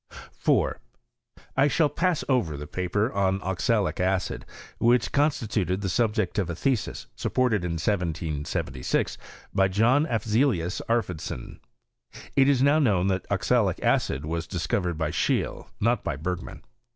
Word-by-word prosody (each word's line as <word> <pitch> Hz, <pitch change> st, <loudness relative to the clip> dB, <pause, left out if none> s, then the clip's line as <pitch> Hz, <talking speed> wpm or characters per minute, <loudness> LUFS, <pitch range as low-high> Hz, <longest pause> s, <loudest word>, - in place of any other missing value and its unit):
4. -, -, +1 dB, 0.7 s
1 140 Hz, +2 st, +3 dB
shall 160 Hz, +1 st, +3 dB
pass 170 Hz, +3 st, 0 dB
over 105 Hz, -, +1 dB
the 75 Hz, -, -6 dB
paper 95 Hz, -, -1 dB
on 95 Hz, -1 st, +1 dB
oxalic 100 Hz, +2 st, 0 dB
acid,, 95 Hz, 0 st, -1 dB, 0.3 s
"which 120 Hz, -2 st, +3 dB
constituted 110 Hz, -, 0 dB
the 100 Hz, -, -1 dB
subject 110 Hz, -2 st, 0 dB
of 95 Hz, -4 st, -1 dB
a 85 Hz, -, -3 dB
thesis, 125 Hz, +4 st, -1 dB
supported 125 Hz, -7 st, +1 dB
in 85 Hz, -1 st, -2 dB
1776, 80 Hz, -5 st, -2 dB, 0.3 s
by 95 Hz, 0 st, +4 dB
John 120 Hz, -, +3 dB
Afzelius 110 Hz, -, +1 dB
Arfvedson. 90 Hz, -, -2 dB, 0.8 s
It 135 Hz, 0 st, +5 dB
is 135 Hz, -2 st, +3 dB
now 145 Hz, +2 st, +5 dB
known 100 Hz, -, +2 dB
that 95 Hz, -1 st, -1 dB
oxalic -, -, +1 dB
acid 70 Hz, +3 st, +1 dB
was 80 Hz, +1 st, -3 dB
discovered 85 Hz, -1 st, -1 dB
by 80 Hz, -2 st, -1 dB
Scheele, -, -, -1 dB
not 115 Hz, +1 st, +1 dB
by -, -, -2 dB
Bergman. 90 Hz, +4 st, -5 dB
95 Hz, 135 wpm, -26 LUFS, 85-120 Hz, 0.8 s, It